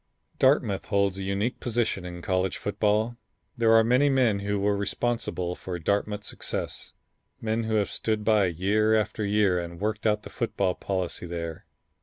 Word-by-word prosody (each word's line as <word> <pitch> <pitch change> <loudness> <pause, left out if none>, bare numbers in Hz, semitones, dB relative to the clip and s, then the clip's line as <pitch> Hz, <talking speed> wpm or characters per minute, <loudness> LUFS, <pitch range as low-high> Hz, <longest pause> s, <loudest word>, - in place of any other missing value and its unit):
Dartmouth 130 -7 +3
holds 100 -1 +1
a - - -3
unique 100 +5 -1
position 115 -6 -1
in 85 -1 -7
college 95 0 0
football. 105 +3 0 0.4
There 115 -2 +4
are 115 0 +7
many 125 +5 +4
men 125 -7 +3
who 100 +1 -1
were 100 +1 +2
responsible 100 -3 -1
for 90 0 -5
Dartmouth's 100 +4 -1
success, - - -4 0.5
men 115 0 -1
who 110 0 0
have 105 -2 +1
stood 110 -1 -1
by 110 -3 +4
year 100 +5 +2
after 110 0 0
year 100 -3 +2
and 85 0 -6
worked 110 +2 -1
out 105 0 +1
the - - -10
football 100 -6 0
policy 90 -2 -3
there. 85 -1 -5
105 Hz, 165 wpm, -27 LUFS, 95-110 Hz, 0.5 s, are